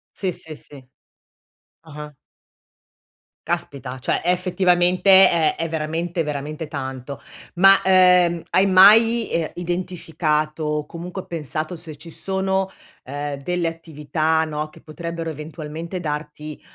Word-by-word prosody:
Sì, 190 Hz, -2 st, -2 dB
sì, 160 Hz, -2 st, -7 dB
sì. 140 Hz, -3 st, -14 dB, 1.0 s
Ah-ah. 150 Hz, -2 st, -10 dB, 1.3 s
Caspita, 140 Hz, -7 st, -3 dB
cioè 130 Hz, -, -1 dB
è 175 Hz, -, -1 dB
effettivamente 180 Hz, 0 st, +2 dB, 0.2 s
ehm, 160 Hz, -3 st, +2 dB
è 165 Hz, -, -2 dB
veramente, 165 Hz, +2 st, -2 dB
veramente 150 Hz, +1 st, -4 dB
tanto. 135 Hz, -2 st, -6 dB, 0.4 s
Ma, 195 Hz, +2 st, +7 dB
uhm, 180 Hz, -2 st, +4 dB
hai 190 Hz, -, +4 dB
mai, 220 Hz, +5 st, +6 dB
ehm, 165 Hz, -2 st, -1 dB
identificato 165 Hz, -3 st, -2 dB
o 150 Hz, 0 st, -1 dB
comunque 175 Hz, +4 st, -7 dB
pensato 155 Hz, +1 st, -4 dB
se 160 Hz, -2 st, -9 dB
ci 160 Hz, +3 st, -11 dB
sono, 190 Hz, +1 st, -1 dB, 0.4 s
uhm, 145 Hz, +1 st, -4 dB
delle 175 Hz, +3 st, -1 dB
attività, 160 Hz, 0 st, -1 dB
no, 155 Hz, 0 st, -4 dB
che -, -, -17 dB
potrebbero 165 Hz, +1 st, -6 dB
eventualmente 155 Hz, +3 st, -7 dB
darti, 150 Hz, -1 st, -6 dB
165 Hz, 120 wpm, -21 LUFS, 150-180 Hz, 1.3 s, Ma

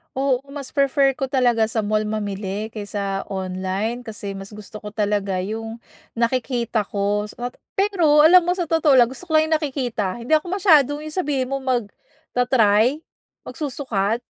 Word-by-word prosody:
Oo, 265 Hz, -1 st, +1 dB
mas 280 Hz, -1 st, -8 dB
prefer 275 Hz, -1 st, +3 dB
ko 275 Hz, -, -5 dB
talaga 245 Hz, -4 st, +3 dB
sa 230 Hz, -, 0 dB
mall 215 Hz, 0 st, 0 dB
mamili, 205 Hz, -1 st, -3 dB
kaysa 205 Hz, -2 st, -4 dB
online 190 Hz, +5 st, -3 dB
kasi 205 Hz, -3 st, -6 dB
mas 195 Hz, +2 st, -9 dB
gusto 210 Hz, 0 st, -11 dB
ko 210 Hz, -, -6 dB
talaga 205 Hz, -3 st, -1 dB
yung 225 Hz, +4 st, -5 dB, 0.4 s
nakikita 235 Hz, -2 st, 0 dB
ko, 205 Hz, +1 st, -1 dB
so -, -, -20 dB
nat 245 Hz, 0 st, -4 dB, 0.2 s
pero 345 Hz, -7 st, +3 dB
alam 340 Hz, +3 st, +7 dB
mo 355 Hz, -, 0 dB
sa 355 Hz, -3 st, -2 dB
totoo 320 Hz, -2 st, +3 dB
lang 245 Hz, -3 st, +6 dB
gusto 265 Hz, +8 st, -8 dB
ko 315 Hz, -3 st, +3 dB
lang 315 Hz, -, +1 dB
yung 315 Hz, -, +2 dB
nakikita 245 Hz, -, -2 dB
hindi 255 Hz, +7 st, +2 dB
ako 345 Hz, +3 st, -1 dB
masyadong 300 Hz, -7 st, +4 dB
yung 310 Hz, -, -7 dB
sabihin 280 Hz, -8 st, -1 dB
mo, 275 Hz, 0 st, -3 dB
magta-try, 245 Hz, -, +1 dB, 0.5 s
magsusukat 240 Hz, -, -2 dB
240 Hz, 165 wpm, -22 LUFS, 210-285 Hz, 0.5 s, alam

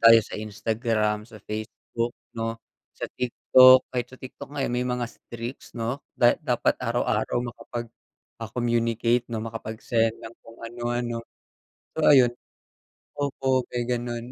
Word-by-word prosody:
tayo 115 Hz, 0 st, +9 dB
sa -, -, -14 dB
Instagram, 110 Hz, 0 st, -1 dB
sa 110 Hz, -, -12 dB
Facebook, 115 Hz, +2 st, -4 dB, 0.2 s
'no, 115 Hz, 0 st, -3 dB, 0.4 s
sa -, -, -4 dB
TikTok. 130 Hz, +1 st, +6 dB
Kahit 125 Hz, -1 st, -1 dB
sa 130 Hz, -, -13 dB
TikTok 130 Hz, +2 st, -10 dB
nga, 135 Hz, -, 0 dB
eh, -, -, -2 dB
may 125 Hz, -, +1 dB
mga 125 Hz, -1 st, -1 dB
streaks, 120 Hz, +2 st, -8 dB
'no? 120 Hz, +4 st, -2 dB, 0.2 s
Da 120 Hz, -1 st, +4 dB
dapat -, -, +1 dB
araw-araw, -, -, 0 dB, 0.2 s
makapag 120 Hz, -1 st, -6 dB, 0.5 s
ah, 115 Hz, -, -4 dB
communicate 120 Hz, 0 st, +1 dB
'no, 115 Hz, -1 st, -3 dB
makapag-send 115 Hz, 0 st, -1 dB
ng 115 Hz, -, -8 dB
kung 115 Hz, -, -15 dB
ano-ano. 120 Hz, 0 st, -2 dB, 0.7 s
So 160 Hz, -, -2 dB
ayun. 130 Hz, -4 st, +7 dB, 0.9 s
Opo 135 Hz, -3 st, +1 dB
may 120 Hz, 0 st, -1 dB
gano'n. 120 Hz, -1 st, -2 dB
120 Hz, 140 wpm, -26 LUFS, 115-125 Hz, 0.9 s, tayo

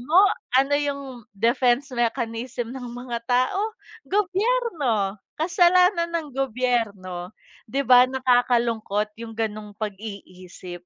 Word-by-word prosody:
mo, 300 Hz, +8 st, 0 dB, 0.4 s
ano 275 Hz, +2 st, +3 dB
'yong 285 Hz, -1 st, -2 dB, 0.3 s
defense 245 Hz, +5 st, +2 dB
mechanism 235 Hz, 0 st, -2 dB
ng 255 Hz, -2 st, -7 dB
mga 245 Hz, -1 st, -4 dB
tao? 380 Hz, -, +1 dB, 0.3 s
Gobyerno, 370 Hz, -, 0 dB, 0.2 s
kasalanan 350 Hz, +1 st, +3 dB
ng 320 Hz, -3 st, -2 dB
gobyerno, 220 Hz, -8 st, -2 dB, 0.3 s
'di 275 Hz, +5 st, 0 dB
ba, 250 Hz, +1 st, +7 dB
nakakalungkot 240 Hz, -5 st, +1 dB
'yong 225 Hz, -1 st, -8 dB
gano'ng 215 Hz, -2 st, -3 dB
pag-iisip. 195 Hz, -4 st, -8 dB
245 Hz, 100 wpm, -24 LUFS, 220-285 Hz, 0.4 s, ba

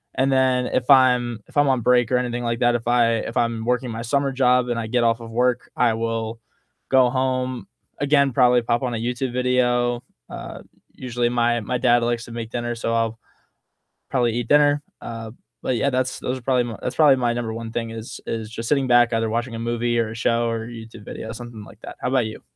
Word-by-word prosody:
And 130 Hz, +1 st, +2 dB
then 130 Hz, -1 st, +2 dB
if 125 Hz, +2 st, -2 dB
I'm 125 Hz, -4 st, +4 dB
if -, -, -20 dB
I'm 145 Hz, -1 st, +4 dB
on 130 Hz, -2 st, +2 dB
break 125 Hz, 0 st, +3 dB
or 125 Hz, -, +4 dB
anything 120 Hz, -1 st, -2 dB
like 115 Hz, 0 st, -1 dB
that, 120 Hz, 0 st, +3 dB
if 115 Hz, -1 st, -3 dB
I 120 Hz, -1 st, +3 dB
if 115 Hz, -, -5 dB
I'm 115 Hz, -1 st, 0 dB
working 125 Hz, +1 st, 0 dB
my 115 Hz, +1 st, -5 dB
summer 140 Hz, +3 st, 0 dB
job 125 Hz, -1 st, +3 dB
and 120 Hz, -, -1 dB
I 115 Hz, -, -3 dB
get 120 Hz, +1 st, +1 dB
off 115 Hz, 0 st, +1 dB
of 115 Hz, 0 st, -9 dB
work, 125 Hz, +1 st, 0 dB
I 120 Hz, -2 st, +3 dB
will 115 Hz, 0 st, -3 dB, 0.5 s
go 130 Hz, -2 st, +5 dB
home, 130 Hz, -1 st, -1 dB, 0.3 s
again, 140 Hz, -2 st, +3 dB
probably 125 Hz, 0 st, +4 dB
pop 120 Hz, +2 st, 0 dB
on 125 Hz, -2 st, -1 dB
a -, -, -2 dB
YouTube 125 Hz, +3 st, -2 dB
video. 125 Hz, -1 st, +1 dB, 0.3 s
Uh, -, -, -8 dB, 0.3 s
usually 120 Hz, -1 st, -2 dB
my 120 Hz, -1 st, +1 dB
my 125 Hz, +4 st, -2 dB
dad 120 Hz, -1 st, +3 dB
likes 120 Hz, 0 st, -1 dB
to 120 Hz, -, -12 dB
make 115 Hz, -1 st, -6 dB
dinner, 120 Hz, 0 st, -3 dB
so 115 Hz, 0 st, -2 dB
I'll 115 Hz, 0 st, -1 dB, 0.9 s
probably 120 Hz, -4 st, +1 dB
eat 120 Hz, -, -4 dB
dinner. 145 Hz, +1 st, +4 dB, 0.2 s
Uh, 115 Hz, -1 st, -7 dB, 0.3 s
but 130 Hz, -, -1 dB
yeah, 140 Hz, -, +1 dB
that's 130 Hz, -1 st, -1 dB
those 125 Hz, +1 st, -3 dB
are -, -, -17 dB
probably 125 Hz, 0 st, +2 dB
my 115 Hz, -3 st, -6 dB
That's -, -, -3 dB
probably 145 Hz, -4 st, +5 dB
my 120 Hz, -2 st, +1 dB
number 120 Hz, -2 st, -3 dB
one 115 Hz, 0 st, -6 dB
thing 115 Hz, -1 st, -2 dB
is 115 Hz, 0 st, -8 dB
is 110 Hz, -2 st, -4 dB
just 115 Hz, +1 st, -6 dB
sitting 140 Hz, -3 st, +2 dB
back 120 Hz, -1 st, +5 dB
either 115 Hz, 0 st, 0 dB
watching 115 Hz, +2 st, -2 dB
a -, -, -5 dB
movie 120 Hz, 0 st, -1 dB
or 110 Hz, -2 st, -1 dB
a -, -, -8 dB
show 115 Hz, +1 st, +1 dB
or 115 Hz, -1 st, -2 dB
a -, -, -9 dB
YouTube 115 Hz, -2 st, -10 dB
video, 110 Hz, -, -7 dB
something 115 Hz, -2 st, -9 dB
like -, -, -16 dB
that. -, -, -9 dB
How -, -, -1 dB
about 130 Hz, -3 st, +2 dB
you? 110 Hz, -, -9 dB
120 Hz, 230 wpm, -22 LUFS, 115-125 Hz, 0.9 s, go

